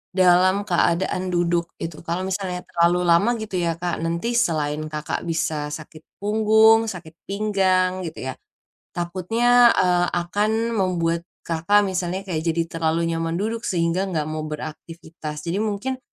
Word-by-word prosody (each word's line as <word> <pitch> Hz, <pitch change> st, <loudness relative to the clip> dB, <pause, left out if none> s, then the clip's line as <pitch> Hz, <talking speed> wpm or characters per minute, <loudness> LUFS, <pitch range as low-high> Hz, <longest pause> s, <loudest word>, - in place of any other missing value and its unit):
dalam 185 Hz, +2 st, +4 dB
keadaan 185 Hz, -1 st, +1 dB
duduk, 175 Hz, -1 st, +1 dB
gitu. 165 Hz, -2 st, -6 dB
Kalau 170 Hz, +2 st, -1 dB
misalnya 185 Hz, -1 st, -3 dB
terlalu 170 Hz, +1 st, +2 dB
lama 180 Hz, +8 st, +3 dB
gitu 215 Hz, -5 st, -4 dB
ya, 170 Hz, -1 st, 0 dB
Kak, 175 Hz, +1 st, -3 dB
nanti 170 Hz, +8 st, -2 dB
selain 155 Hz, -10 st, +1 dB
Kakak, 155 Hz, +2 st, -4 dB
bisa 155 Hz, -2 st, -1 dB
sakit 155 Hz, +1 st, -9 dB, 0.2 s
punggung, 220 Hz, +1 st, +5 dB
sakit 170 Hz, -5 st, -8 dB
pinggang, 190 Hz, -3 st, +1 dB
gitu 130 Hz, -5 st, -5 dB
ya, -, -, -7 dB, 0.6 s
takutnya, 225 Hz, +8 st, +3 dB
eee, 180 Hz, -1 st, +3 dB, 0.2 s
akan 215 Hz, +5 st, 0 dB
membuat 175 Hz, -5 st, 0 dB, 0.2 s
Kakak 170 Hz, +5 st, +2 dB
misalnya 185 Hz, -1 st, -2 dB
kayak 180 Hz, -5 st, -3 dB
jadi 165 Hz, 0 st, +1 dB, 0.2 s
terlalu 165 Hz, +1 st, +1 dB
nyaman 165 Hz, 0 st, -2 dB
duduk, 225 Hz, +5 st, -2 dB
sehingga 175 Hz, +2 st, 0 dB
enggak 165 Hz, -5 st, -1 dB
mau 155 Hz, 0 st, -4 dB
beraktivitas. 155 Hz, 0 st, -7 dB
Jadi 175 Hz, +3 st, -2 dB
mungkin, 220 Hz, +5 st, -2 dB
180 Hz, 140 wpm, -23 LUFS, 165-200 Hz, 0.6 s, punggung